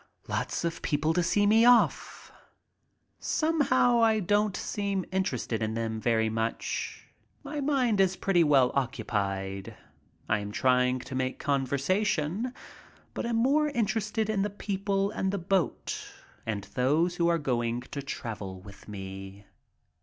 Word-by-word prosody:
Lots -, -, -2 dB
of 170 Hz, 0 st, -3 dB
people 155 Hz, +2 st, +1 dB
to 175 Hz, -, +2 dB
see 205 Hz, +4 st, +2 dB
me 220 Hz, +2 st, +5 dB
off. 245 Hz, 0 st, +3 dB, 0.9 s
Somehow 255 Hz, -7 st, +2 dB
I 220 Hz, -1 st, +4 dB
don't 205 Hz, 0 st, +1 dB
seem 200 Hz, -2 st, -2 dB
interested 125 Hz, -11 st, -1 dB
in 110 Hz, 0 st, -1 dB
them 110 Hz, -1 st, -2 dB
very 110 Hz, -1 st, +2 dB
much. 110 Hz, +1 st, -3 dB, 0.4 s
My 295 Hz, +1 st, -5 dB
mind 255 Hz, -8 st, +2 dB
is 190 Hz, -1 st, +2 dB
pretty 180 Hz, -4 st, +2 dB
well 135 Hz, -5 st, +4 dB
occupied. 100 Hz, -7 st, -2 dB, 0.5 s
I 105 Hz, -, +2 dB
am 100 Hz, 0 st, -6 dB
trying 125 Hz, +2 st, +2 dB
to 135 Hz, -, -9 dB
make 130 Hz, 0 st, -1 dB
conversation, 155 Hz, -, 0 dB, 0.6 s
but -, -, -3 dB
am 235 Hz, -, 0 dB
more 280 Hz, +6 st, +3 dB
interested 220 Hz, -3 st, -1 dB
in 215 Hz, -2 st, 0 dB
the 205 Hz, -, 0 dB
people 200 Hz, 0 st, -1 dB
and 190 Hz, -2 st, -1 dB
the 200 Hz, -, -1 dB
boat 190 Hz, 0 st, -1 dB, 0.4 s
and 105 Hz, -3 st, -2 dB
those 160 Hz, +8 st, +2 dB
who 170 Hz, -, +2 dB
are 170 Hz, 0 st, +3 dB
going 120 Hz, -5 st, -1 dB
to 140 Hz, +3 st, -6 dB
travel 105 Hz, -9 st, -6 dB
with 100 Hz, +1 st, -14 dB
me. 95 Hz, 0 st, -8 dB
165 Hz, 140 wpm, -28 LUFS, -, 0.9 s, me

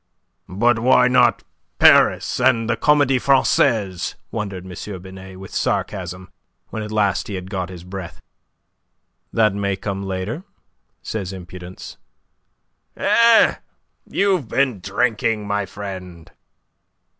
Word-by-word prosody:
"But 110 Hz, +5 st, +2 dB
why 125 Hz, +1 st, +5 dB
not 125 Hz, -2 st, +3 dB, 0.3 s
Paris -, -, +5 dB
and 120 Hz, -3 st, +3 dB
the 120 Hz, -, +1 dB
Comedie 145 Hz, -1 st, +3 dB
Francaise?" 110 Hz, -8 st, +2 dB, 0.2 s
wondered 100 Hz, -4 st, -5 dB
M. 95 Hz, +1 st, -7 dB
Binet, 95 Hz, 0 st, -11 dB
with 95 Hz, -, -11 dB
sarcasm, 95 Hz, -2 st, -3 dB, 0.4 s
when 110 Hz, -, -5 dB
at 105 Hz, 0 st, -6 dB
last 100 Hz, -3 st, +1 dB
he 100 Hz, -, -5 dB
had 90 Hz, +1 st, -7 dB
got 95 Hz, -3 st, -3 dB
his 90 Hz, -2 st, -10 dB
breath. 90 Hz, -1 st, -8 dB, 1.1 s
"That 110 Hz, -3 st, +3 dB
may 100 Hz, -1 st, -1 dB
come 95 Hz, 0 st, -4 dB
later," 95 Hz, -, -4 dB, 0.6 s
says 100 Hz, -4 st, -4 dB
impudence. 90 Hz, -1 st, -10 dB, 1.0 s
"Eh? 230 Hz, -1 st, +5 dB, 0.5 s
You've 190 Hz, -, +1 dB
been 130 Hz, -2 st, 0 dB
drinking, 105 Hz, +2 st, 0 dB
my 100 Hz, -1 st, -1 dB
friend." 95 Hz, -4 st, -8 dB
100 Hz, 115 wpm, -21 LUFS, 95-115 Hz, 1.1 s, why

